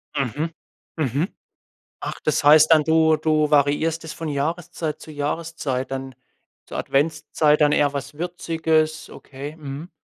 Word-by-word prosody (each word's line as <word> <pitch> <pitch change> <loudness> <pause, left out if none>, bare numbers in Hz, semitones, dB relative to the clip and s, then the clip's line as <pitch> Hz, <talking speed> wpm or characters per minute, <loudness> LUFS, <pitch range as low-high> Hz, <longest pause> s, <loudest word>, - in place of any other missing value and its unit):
Mhm. 145 +4 -1 0.4
Mhm. 150 - 0 0.7
Ach, - - -5
das 155 - +1
heißt 155 +2 +7
dann, 155 -2 +6
du 160 0 +4
du 155 -1 +1
variierst 150 +3 +2
es 160 - -6
von 165 -1 -6
Jahreszeit 155 +2 -3
zu - - -11
Jahreszeit, 145 -3 -3
dann 135 -1 -5 0.5
zur - - -6
Adventszeit 150 +1 +1
dann 150 -1 +4
eher 145 -1 +3
was 140 +1 -5
Würziges, 160 -2 -1
okay. 145 +3 -9
Mhm. 145 +2 -7
155 Hz, 140 wpm, -23 LUFS, 145-160 Hz, 0.7 s, heißt